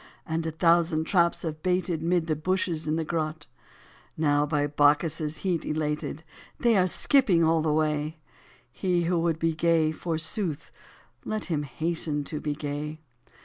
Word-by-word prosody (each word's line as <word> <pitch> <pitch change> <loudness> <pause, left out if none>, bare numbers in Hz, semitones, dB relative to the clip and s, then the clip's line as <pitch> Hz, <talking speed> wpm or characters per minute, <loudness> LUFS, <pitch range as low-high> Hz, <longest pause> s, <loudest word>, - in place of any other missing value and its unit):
And 160 0 -2
a - - -2
thousand 165 0 +2
traps 170 0 +1
have 155 -2 -4
baited 180 -2 0
Mid 170 0 +1
the 155 -1 0
bushes, 165 -1 -1
in 155 - +1
the 165 - -1
grot; 155 -2 -3 0.7
Now 145 -1 +2
by 145 -1 +1
Bacchus* 150 +2 +2 0.2
heat 180 -4 -1
elated 150 0 -3 0.4
They 235 -2 +3
are 185 -2 +4
skipping 185 - +3
all 160 0 +3
the 155 -1 0
way: 155 0 0 0.5
He 175 +4 0
who 170 0 +1
would 165 -1 0
be 165 0 0
gay, 160 -1 +2
forsooth, 160 +1 -2 0.5
Let 215 -1 -2
him 150 - 0
hasten 155 0 -1
to 150 +1 -5
be 150 -1 -3
gay. 150 +1 -5
160 Hz, 155 wpm, -27 LUFS, 150-170 Hz, 0.7 s, are